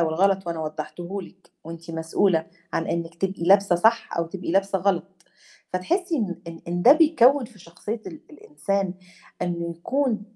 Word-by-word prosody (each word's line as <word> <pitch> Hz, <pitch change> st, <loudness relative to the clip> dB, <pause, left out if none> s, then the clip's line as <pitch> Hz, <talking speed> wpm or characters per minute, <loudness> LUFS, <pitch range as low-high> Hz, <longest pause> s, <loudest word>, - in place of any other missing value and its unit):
والغلط 185 Hz, +3 st, +2 dB
وأنا 170 Hz, -1 st, -3 dB
وضحّته 160 Hz, +5 st, -5 dB
لِك 170 Hz, -1 st, -16 dB
وأنتِ 165 Hz, +1 st, -9 dB
مسؤولة 165 Hz, +1 st, +1 dB, 0.3 s
عن 165 Hz, -, -1 dB
إنِك 170 Hz, 0 st, -3 dB
تبقي 190 Hz, 0 st, -2 dB
لابسة 195 Hz, 0 st, +5 dB
صح 225 Hz, +6 st, +3 dB
أو 170 Hz, -, +1 dB
تبقي 180 Hz, 0 st, -5 dB
لابسة 195 Hz, 0 st, +2 dB
غلط، 185 Hz, -2 st, +1 dB, 0.7 s
فتحسّي 340 Hz, -, 0 dB
إن 200 Hz, -10 st, -2 dB
إن 165 Hz, 0 st, -9 dB
إن 175 Hz, +1 st, -1 dB
ده 255 Hz, -, +9 dB
بيكّون 290 Hz, -4 st, +5 dB
في 230 Hz, -2 st, -14 dB
شخصية 200 Hz, +6 st, -6 dB
ال 165 Hz, -4 st, -8 dB
الإنسان 180 Hz, +6 st, -2 dB, 0.5 s
إنه 170 Hz, -1 st, -2 dB
يكون 240 Hz, +4 st, 0 dB
180 Hz, 155 wpm, -24 LUFS, 170-205 Hz, 0.7 s, ده